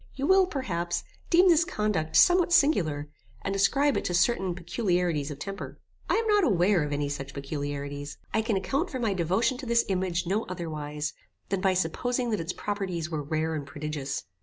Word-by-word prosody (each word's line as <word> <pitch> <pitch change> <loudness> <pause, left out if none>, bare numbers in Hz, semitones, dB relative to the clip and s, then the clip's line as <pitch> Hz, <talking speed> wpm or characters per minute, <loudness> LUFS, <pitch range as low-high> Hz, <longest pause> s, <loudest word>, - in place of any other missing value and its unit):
You 270 - -2
will, 380 +1 +5
perhaps, 175 - -2 0.3
deem 360 +2 +6
this 340 -2 +6
conduct 205 - -1
somewhat 355 -1 +6
singular, 185 - +3 0.4
and 195 - -2
ascribe 275 +8 +3
it - - -1
to 175 - 0
certain 185 -2 +2
peculiarities 175 - 0
of 145 - -6
temper. 195 +5 -7 0.3
I - - +3
am 455 0 +1
not 415 -2 +4
aware 190 - +3
of 150 -1 -2
any 145 0 -1
such 140 -1 -5
peculiarities. 145 0 -5 0.2
I 220 - +3
can 220 -2 0
account 275 - -1
for 265 - -4
my 225 -5 0
devotion 190 +8 +1
to 265 - -7
this 235 0 +3
image 185 -2 0
no 200 +6 0
otherwise, 155 -4 -4 0.4
than 195 -1 -1
by 190 -1 +2
supposing 240 +8 -1
that 215 - 0
its 165 +1 -2
properties 185 -6 -3
were 155 -2 -2
rare 155 +2 -1
and 150 -2 -3
prodigious. 145 -1 -4
185 Hz, 185 wpm, -27 LUFS, 155-235 Hz, 0.4 s, deem